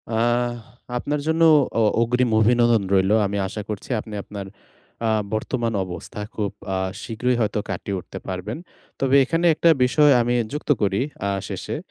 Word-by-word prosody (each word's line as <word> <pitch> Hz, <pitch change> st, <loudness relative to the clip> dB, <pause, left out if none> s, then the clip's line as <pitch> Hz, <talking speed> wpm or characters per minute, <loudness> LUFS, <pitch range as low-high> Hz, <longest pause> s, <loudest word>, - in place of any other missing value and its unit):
আহ! 120 Hz, +1 st, +1 dB, 0.4 s
আপনার 145 Hz, +4 st, -2 dB
জন্য 160 Hz, +1 st, +1 dB, 0.4 s
অ -, -, +3 dB, 0.2 s
অগ্রিম 125 Hz, +1 st, +2 dB
অভিনন্দন 120 Hz, -1 st, +4 dB
রইলো। 95 Hz, +2 st, +4 dB
আমি 100 Hz, +1 st, -2 dB
আশা 105 Hz, +2 st, -5 dB
করছি 105 Hz, -2 st, -6 dB
আপনি 110 Hz, -, -11 dB
আপনার 100 Hz, -2 st, -7 dB, 0.6 s
আ -, -, +2 dB, 0.2 s
বর্তমান 115 Hz, +1 st, -1 dB
অবস্থা 90 Hz, +3 st, -8 dB, 0.2 s
খুব 105 Hz, -3 st, -2 dB, 0.2 s
আ -, -, 0 dB, 0.3 s
শীঘ্রই 125 Hz, +2 st, -1 dB
হয়তো 105 Hz, -1 st, 0 dB
কাটিয়ে 95 Hz, +1 st, -3 dB
উঠতে -, -, -10 dB
পারবেন। 95 Hz, +4 st, -4 dB, 0.4 s
তবে 135 Hz, 0 st, +2 dB
এখানে 165 Hz, +6 st, 0 dB
একটা 170 Hz, -, +3 dB
বিষয় 145 Hz, +3 st, +4 dB
আমি 120 Hz, +1 st, 0 dB, 0.2 s
যুক্ত 150 Hz, -, -6 dB
করি 100 Hz, +1 st, +1 dB, 0.3 s
আ -, -, 0 dB, 0.2 s
শেষে, -, -, -4 dB
115 Hz, 155 wpm, -23 LUFS, 100-125 Hz, 0.6 s, অভিনন্দন